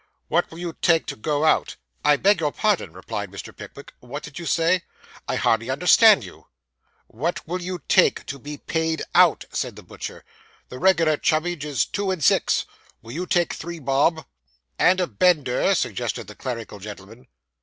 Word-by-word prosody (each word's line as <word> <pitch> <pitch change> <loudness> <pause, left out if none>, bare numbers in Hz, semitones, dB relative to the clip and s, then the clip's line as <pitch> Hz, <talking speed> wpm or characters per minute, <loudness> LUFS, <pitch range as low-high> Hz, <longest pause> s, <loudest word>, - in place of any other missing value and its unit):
'What 175 +2 +1
will 165 - -12
you 170 -1 -5
take 165 -2 +3
to - - -5
go 150 +6 -1
out?' 155 - +2 0.3
I 150 - +5
beg 200 +1 +3
your 150 -3 0
pardon,' 210 - 0
replied 95 +3 -6
Mr. 100 -2 -9
Pickwick. - - -11
'What 145 +5 -8
did 150 +2 -9
you 170 - -6
say? 165 +4 +2 0.5
I - - -1
hardly 115 +2 +1
understand 180 - +6
you.' 90 - -13 0.6
'What 160 +10 -4
will 180 +2 -3
you 180 0 -5
take 185 - +3
to 140 - -6
be 145 +3 -7
paid 160 +1 -2
out?' - - +5
said - - -3
the - - -12
butcher. - - -9 0.4
'The 125 - -8
regular 165 -4 +3
chummage 155 0 0
is 140 -8 0
two 200 -1 -3
and 185 -5 -2
six. - - +3 0.4
Will 115 - -10
you 180 +7 -4
take 175 -3 +1
three 170 +1 -6
bob?' 145 +2 +1 0.5
'And 185 +1 +4
a 180 - +2
bender,' 160 -9 +2
suggested - - -2
the - - -11
clerical 115 -5 -6
gentleman. 105 +3 -11
155 Hz, 175 wpm, -23 LUFS, 130-175 Hz, 0.6 s, understand